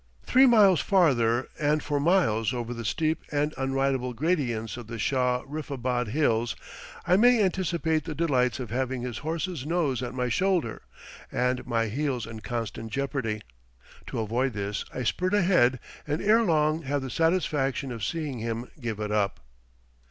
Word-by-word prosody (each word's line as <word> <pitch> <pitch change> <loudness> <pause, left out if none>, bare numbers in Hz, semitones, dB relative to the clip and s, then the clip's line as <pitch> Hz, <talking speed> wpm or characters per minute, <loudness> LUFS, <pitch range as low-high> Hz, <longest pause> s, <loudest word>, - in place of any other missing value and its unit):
Three 265 +2 +5
miles 205 - +6
farther, 130 - +3
and 150 0 +1
for 145 -1 -1
miles 135 - +2
over 120 0 -3
the 115 -1 -6
steep 155 +7 0
and 150 +1 0
unridable 135 -1 0
gradients 120 -7 -1
of 120 -3 -9
the 115 0 -6
Shah 125 +2 +1
riffabad 130 -5 -3
hills, 115 -3 +1 0.5
I 180 +2 +4
may 245 +2 +5
anticipate 170 -4 0
the 160 -2 -5
delights 130 -7 +1
of 125 -4 -6
having 130 0 -2
his 120 -2 -4
horse's 160 0 -3
nose 150 -5 0
at 125 0 -5
my 125 -1 0
shoulder, 175 - 0 0.5
and 125 +1 0
my 115 -2 +1
heels 125 +1 -2
in 115 -1 -8
constant 115 -1 -5
jeopardy. 135 -6 -2 0.7
To - - -5
avoid 120 +4 0
this, 100 0 -3
I 125 - -4
spurt 185 - 0
ahead, 170 -11 +3 0.3
and 150 +2 -1
ere 215 +4 +4
long 155 -5 +2
have 140 -2 -2
the 130 - -5
satisfaction 145 -5 0
of 115 -3 -6
seeing 145 - -3
him 115 +2 -4
give 115 -4 -4
it 105 -1 -3
up. 105 -2 0
130 Hz, 160 wpm, -27 LUFS, 120-160 Hz, 0.7 s, miles